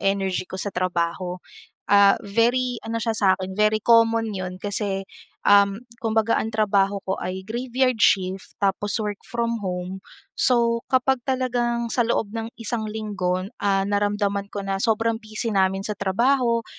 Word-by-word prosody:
energy 195 -2 0
ko 190 - -6
sa 200 +1 -4
trabaho. 180 0 -1 0.5
Ah, 200 0 +6
very 240 +4 0
ano 230 0 -3
siya 225 0 -1
sa 200 - +2
'kin 190 0 -5
very 215 +1 +3
common 225 -1 +3
'yon 185 0 -5
kasi, 200 -1 -3 0.4
um, 200 -1 +5 0.3
kumbaga 225 0 +2
ang 220 - -1
trabaho 200 -2 +2
ko 190 - -1
ay 190 +1 -4
graveyard 255 +2 0
shift 190 -1 +1
tapos 200 +2 0
work 210 -1 -3
from 235 -2 -2
home. 180 +1 -4 0.3
So, 235 -2 +2
kapag 260 0 +2
talagang 240 -3 -1
sa 245 - +2
loob 225 -2 -1
ng 225 0 -4
isang 225 -1 -3
linggo 205 -4 -2
n 195 +6 -8
ah, 195 -1 +2
naramdaman 205 0 0
ko 200 -1 -5
na 195 0 -2
sobrang 225 0 +1
busy 215 +1 -4
namin 195 0 +1
sa 210 - -2
trabaho, 235 +4 +1
205 Hz, 155 wpm, -23 LUFS, 195-230 Hz, 0.5 s, Ah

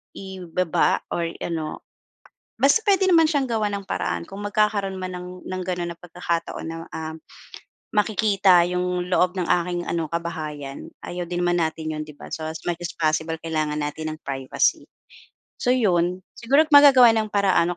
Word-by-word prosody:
ibaba 180 -3 -1
or 170 -1 -1 0.2
ano, 160 -2 -4 0.7
basta 280 +10 +4
puwede 390 -1 +4
naman 325 -2 +6
siyang 275 -6 0
gawan 210 -2 0
ng 200 - -5
paraan. - - -2
Kung 195 +1 -10
magkakaroon 205 -2 +1
man 185 0 -5
ng 180 0 -8
ng 185 0 -4
gano'n 175 -1 -3
na 170 - -26
pagkakataon 170 -1 -4
na, 165 0 -5
um, 160 0 -6 0.8
makikita 200 -4 +4
'yong 180 0 -1
loob 180 +1 +1
ng 180 - -1
aking 175 0 +1
ano, 165 -3 -2
kabahayan 155 -5 -5 0.2
ayaw 180 0 -4
din 175 0 -4
naman 175 -1 +1
natin 155 0 -3
'yon, 155 - -4
'di 150 -1 -11
ba? - - -10
So, 160 -1 -4
as 160 - -6
much 175 0 -2
as 175 - -3
possible 160 0 0
kailangan 155 -2 -2
natin 150 +1 -3
ng 155 - -7
privacy. 135 -1 0 0.7
So, - - -2
'yon, 185 -7 +2
siguro 275 +7 +3
magagawan 270 -5 +8
ng 220 -1 0
paraan 190 -4 +2
175 Hz, 165 wpm, -23 LUFS, 165-200 Hz, 0.8 s, magagawan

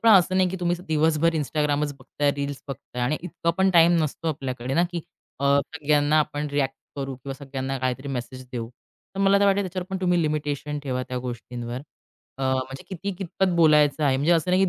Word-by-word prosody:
पण 230 - +5
असं 185 -2 +6
नाही 185 -1 +4
की 190 - -4
तुम्ही 175 0 +1
दिवसभर 160 +1 +3
Instagramच 150 -1 0
बघताय, 145 +2 0
रील्स 140 -1 -4
बघताय 130 -2 -5
आणि 140 +5 +1
इतका 170 -1 -1
पण 190 0 +4
टाईम 170 -1 +6
नसतो 155 +2 -2
आपल्याकडे 130 -4 -3
ना, 170 - +4
की 170 -2 -3 0.4
अ, - - 0 0.3
सगळ्यांना 150 0 +3
आपण 150 0 -2
रिएक्ट 140 -2 0 0.2
करू 135 -1 -3
किंवा 135 +1 -7
सगळ्यांना 135 -1 -4
काहीतरी 130 +2 -2
मेसेज 130 0 -5
देऊ. 115 -2 -3 0.5
तर 195 - -3
मला 195 0 +5
तर - - +5
वाटेल 200 0 +4
त्याच्यावर 185 0 -4
पण 190 - -1
तुम्ही 180 -2 +2
लिमिटेशन 150 -1 -2
ठेवा. 130 -2 -2
त्या 125 0 -2
गोष्टींवर. 120 0 -5 0.6
अ, - - -4
म्हणजे 130 0 -1
किती, 195 +1 -4
कितपत 190 0 0
बोलायचं 150 -2 +5
आहे. 135 -2 +3
म्हणजे 145 +6 +3
असं 170 +1 +2
नाही, 185 +1 +4
की 190 - +4
150 Hz, 200 wpm, -25 LUFS, 135-170 Hz, 0.6 s, असं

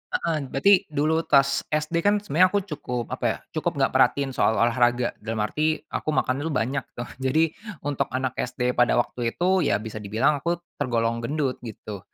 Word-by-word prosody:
heeh, 165 -2 0
berarti 180 +9 +3
dulu 155 +2 0
tas 140 -1 +3
SD 155 +2 0
kan 205 +3 +2
sebenarnya 185 -1 +4
aku 205 -1 +1
cukup 125 - -5
apa - - -3
ya, - - 0
cukup - - -1
enggak - - +1
perhatiin 140 -1 +3
soal 110 -2 +2
olahraga, 120 +1 +2
dalam 110 0 -2
arti 155 +7 +1 0.2
aku - - -4
makan 130 - +1
dulu 160 +3 -3
banyak 130 +3 0
tuh. 120 - -5
Jadi, 150 +5 +2 0.3
untuk 145 -1 -1
anak 130 -1 0
SD 125 0 -1
pada 125 -1 +3
waktu 120 -1 -1
itu, 185 +2 +2
ya 145 - +2
bisa 110 +1 -5
dibilang 115 +9 +1
aku 170 +5 0 0.2
tergolong 115 -4 0
gendut 135 +2 -2
gitu 110 -3 -8
135 Hz, 185 wpm, -25 LUFS, 120-155 Hz, 0.3 s, sebenarnya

